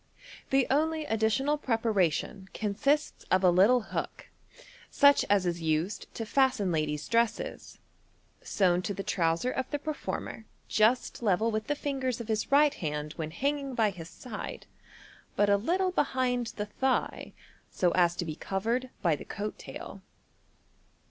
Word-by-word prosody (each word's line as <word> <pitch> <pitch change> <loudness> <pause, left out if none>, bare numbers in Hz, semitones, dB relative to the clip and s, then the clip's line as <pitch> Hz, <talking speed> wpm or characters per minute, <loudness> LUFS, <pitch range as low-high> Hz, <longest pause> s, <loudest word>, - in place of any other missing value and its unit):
The 270 -1 +3
only 315 +2 +1
additional 225 +7 +1
preparation 205 - 0
consists 275 +9 0
of 185 0 +3
a 180 - +6
little 205 +8 +5
hook, - - -4 0.6
such 285 -1 +5
as 200 -2 +3
is 170 -1 -1
used 160 +5 -1
to 225 - -4
fasten 255 -6 +2
ladies' 150 -2 -1
dresses, 235 0 -1 0.6
sewn 180 -3 +2
to 200 +1 -3
the 195 - -4
trouser 170 +8 0
of 260 0 -3
the 290 - -1
performer 290 -6 -5 0.2
just 225 +4 +2
level 220 +1 +2
with 215 0 -2
the 295 - 0
fingers 265 -4 -2
of 235 -1 -7
his 220 +3 -1
right 290 +1 +5
hand 150 - -4
when 160 -2 -4
hanging 275 - -2
by 220 -3 +2
his 170 -3 -9
side, 240 -5 -7 0.7
but 205 0 +3
a - - +6
little 365 - 0
behind 255 -7 0
the 210 - -2
thigh, 260 +5 -1 0.4
so 180 -2 +1
as 175 -1 +3
to 175 - -3
be 155 -2 -4
covered 230 +9 -2
by 170 -4 +3
the - - -9
coat 210 +1 -5
tail. - - -9
220 Hz, 150 wpm, -29 LUFS, 185-265 Hz, 0.7 s, a